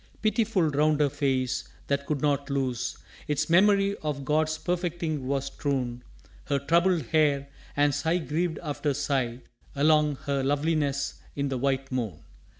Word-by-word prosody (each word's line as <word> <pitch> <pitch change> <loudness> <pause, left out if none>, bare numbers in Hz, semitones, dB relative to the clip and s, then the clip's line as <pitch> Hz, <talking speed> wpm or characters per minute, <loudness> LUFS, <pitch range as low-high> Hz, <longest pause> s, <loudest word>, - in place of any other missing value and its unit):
Pitiful 215 -6 +2
round 150 +1 +2
her 145 -2 +3
face 130 -3 0 0.2
that 140 0 -1
could 150 -3 -1
not 140 -1 +1
lose 130 -3 -1 0.3
Its 150 +1 0
memory 200 +2 +5
of 145 -3 -4
God's 155 +2 +1
perfecting 170 -5 -2
was 140 0 0
strewn 130 -3 -2 0.4
Her 140 - +1
troubled 170 +4 +2
hair, 145 -3 +2 0.3
and 145 0 +4
sigh 160 +5 +1
grieved 165 0 -1
after 145 -2 -1
sigh 130 -4 -1 0.3
Along 150 0 +4
her 140 -1 0
loveliness 145 0 0
in 140 -1 -1
the 135 - -1
white 135 +1 0
moon. 115 -11 -3
145 Hz, 145 wpm, -27 LUFS, 135-160 Hz, 0.4 s, memory